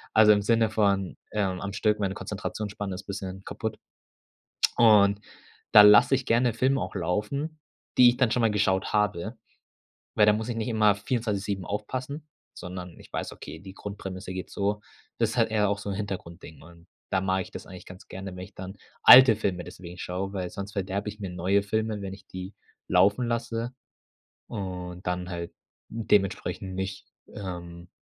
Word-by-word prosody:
Also, 110 -1 +8
im 105 -1 +3
Sinne 115 0 +3
von, 100 -3 +1
ähm, 95 -3 -1
am 100 0 -5
Stück, 105 0 +1
meine 95 -1 -1
Konzentrationsspanne 105 -1 -5
ist 100 - -9
bisschen 95 -1 -6
kaputt. 110 -1 -5 1.0
Und 105 -3 +6 0.5
da 105 -2 +11
lasse 105 +6 +7
ich 130 -1 0
gerne 115 0 +2
Filme 135 +1 +2
auch - - -5
laufen, 140 - -2 0.4
die 125 -1 +9
ich 120 - +3
dann 125 -4 +2
schon 120 - +1
mal 115 -1 +3
geschaut 100 -2 +1
habe, 105 +1 0 0.8
weil 105 - +5
da 105 - +6
muss 110 +2 -2
ich 120 - -2
nicht 110 +1 -2
immer 110 -2 +4
24/7 100 -3 -2
aufpassen, 130 - -4 0.3
sondern 90 -1 -8
ich - - -16
weiß, - - -3
okay, - - -9
die 95 0 -11
Grundprämisse 95 -2 -7
geht 95 0 -6
so 105 +1 -1 0.4
das - - +2
ist - - -5
halt - - +3
eher 105 -2 +2
auch 100 - 0
so 100 0 -5
'n - - -2
Hintergrund-Ding 90 -6 -7
und 85 0 -16 0.2
da 95 - +2
mag 95 0 0
ich - - -12
das - - -9
eigentlich 90 - -11
ganz 95 +1 -12
gerne, 95 0 -7
wenn 90 - -6
ich 95 - -16
dann 95 +1 -8 0.3
alte 125 -2 +10
Filme 90 -5 -2
deswegen 90 0 -10
schaue, 95 +3 -4
weil 90 -2 -3
sonst 100 +1 -7
verderbe 100 +1 -3
ich 105 +1 -7
mir 95 -3 -4
neue 95 +3 +1
Filme, 110 0 -1
wenn 95 -1 -5
ich 95 - -16
die 95 +2 -7 0.3
laufen 100 +7 +4
lasse 115 0 -2 0.8
und 90 -4 -6
dann 90 +1 -2
halt 85 -1 -5 0.4
dementsprechend 100 -3 0
nicht, 95 +1 -4 0.3
ähm, 85 -3 -7
100 Hz, 180 wpm, -27 LUFS, 95-110 Hz, 1.0 s, da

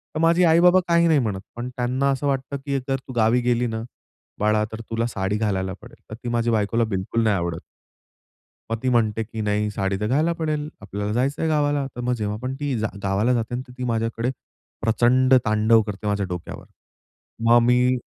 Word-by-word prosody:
तर - - -1
माझे 165 +2 +4
आई-बाबा 175 +3 +6
काही 170 0 +4
नाही 160 -3 +4
म्हणत. 105 -6 -2
पण 120 +1 -5
त्यांना 125 +2 -1
असं 135 +2 -1
वाटतं, 135 0 -2
की 140 -1 0
"जर 135 - +1
तू 130 - -7
गावी 115 +1 +3
गेली 120 0 +1
ना 110 -1 -3 0.6
बाळा, 105 0 +2
तर 110 - -6
तुला 115 0 -1
साडी 100 -2 -2
घालायला 95 -3 -1
पडेल." - - -15
तर 110 - -6
ती 120 - -3
माझी 120 0 0
बायकोला 110 +1 +1
बिलकुल 110 +2 -1
नाही 105 -2 +3
आवडत. 85 -1 -3 1.1
मग 115 - -1
ती 130 - 0
म्हणते 115 -3 +2
की 110 +1 -7
नाही 105 0 0
साडी 95 -1 -1
तर 105 - 0
घाला 150 +8 +2
पडेल, 155 -2 -2
आपल्याला 100 +1 -4
जायचंय 140 +7 0
गावाला. 145 -2 +1
तर - - -4
मग 125 0 0
जेव्हापण 110 +3 -3
ती 145 -3 -1
जा 110 0 -1
गावाला 100 +5 +1
जाते 115 0 -2
ना. 125 - -2
तर 125 - -12
ती 125 - -3
माझ्याकडे 115 +1 -1 0.5
प्रचंड 125 +3 +3
तांडव 110 +1 +4
करते 105 -1 -6
माझ्या 100 -1 0
डोक्यावर. 90 -2 -6 0.8
मग 120 0 +7
मी 125 +1 +3
115 Hz, 195 wpm, -23 LUFS, 105-130 Hz, 1.1 s, मग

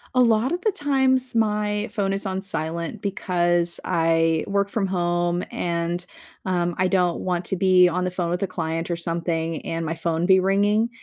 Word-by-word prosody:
A 255 - +5
lot 230 +2 +3
of 355 +1 -2
the 430 - +2
times 265 -5 +1
my 210 -1 0
phone 195 -2 -1
is 195 +1 -1
on 190 0 -3
silent 170 +2 -4
because 175 -4 0
I 165 -1 +2
work 200 0 0
from 205 -2 -1
home 175 -1 0
and, 170 +1 -2 0.4
um, 175 -2 0
I 185 0 +2
don't 180 -2 +1
want 180 -1 -2
to - - -2
be 185 -1 +5
on 180 +1 -1
the 180 - -1
phone 180 -2 -2
with 175 +2 -1
a 195 - 0
client 165 -1 -3
or 170 - +1
something 165 -1 -3
and 165 0 -3
my 165 - -2
phone 165 +1 -1
be 190 -1 +6
ringing. 205 +4 +2
180 Hz, 190 wpm, -23 LUFS, 170-200 Hz, 0.4 s, be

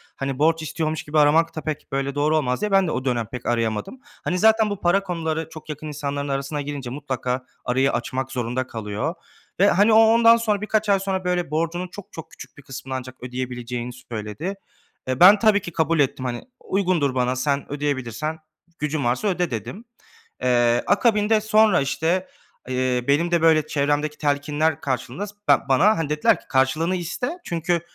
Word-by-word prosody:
hani, 135 0 -4
borç 160 +1 +3
istiyormuş 155 0 -3
gibi 150 +1 0
aramak 160 +3 +4
da 155 - -4
pek, 155 -2 -5
böyle, 140 +1 -2
doğru 155 +2 +2
olmaz 125 0 -1
diye. 210 -1 -1
Ben 195 -2 +4
de - - -1
o 130 - -3
dönem 120 -3 0
pek 120 +2 -8
arayamadım. 115 - -1 0.2
Hani, 180 - -1
zaten 220 0 +4
bu 205 -1 -5
para 195 +3 +2
konuları 160 -3 -3
çok 155 -1 -12
yakın 150 +1 -6
insanların 145 -1 -4
arasına 140 +2 -2
girince 140 -3 -5
mutlaka 130 -2 -3 0.2
arayı 130 +2 +2
açmak 130 +2 -3
zorunda 125 +1 -2
kalıyor 110 - -4 0.4
ve, 200 - +6
hani, 205 +5 +4
o 220 - +7
ondan 230 +1 +6
sonra 210 -3 0
birkaç 215 0 0
ay 195 -1 +4
sonra, 190 -1 -2
böyle, 180 -4 -1
borcunun 170 +3 -1
çok, 200 +2 -12
çok 160 - -9
küçük - - -13
bir 145 - -14
kısmını 130 -1 -7
ancak 130 0 -10
ödeyebileceğini 125 -1 -5
söyledi. 120 - -6 0.5
Eee, 130 0 -2
ben 200 +4 +8
tabii 215 -2 +4
ki 175 - -7
kabul 160 0 +1
ettim, 130 -2 0
hani, 120 -1 -4 0.2
"Uygundur 175 -9 0
bana, 125 0 +1
sen 140 +2 -1
ödeyebilirsen, 145 +1 -3 0.4
gücün 150 0 -1
varsa 125 - 0
öde," 180 -5 0
dedim. 155 - -6 0.6
Eee, 120 -1 +3
akabinde 215 -1 +3
sonra, 215 -5 +4
işte, 165 +7 0 0.4
eee, 130 -1 0
benim 165 +5 +2
de, 170 -1 +2
böyle, 155 -2 +4
çevremdeki 145 +1 0
telkinler 145 +1 0
karşılığında 135 - -3
s 205 - -13
ben - - +5
bana, 195 +12 +4
hani, 160 -3 -2
dediler 150 0 +2
ki, - - -22
"Karşılığını 150 +7 +1
iste. 245 - -3
Çünkü, 170 0 -1
150 Hz, 185 wpm, -23 LUFS, 130-180 Hz, 0.6 s, ben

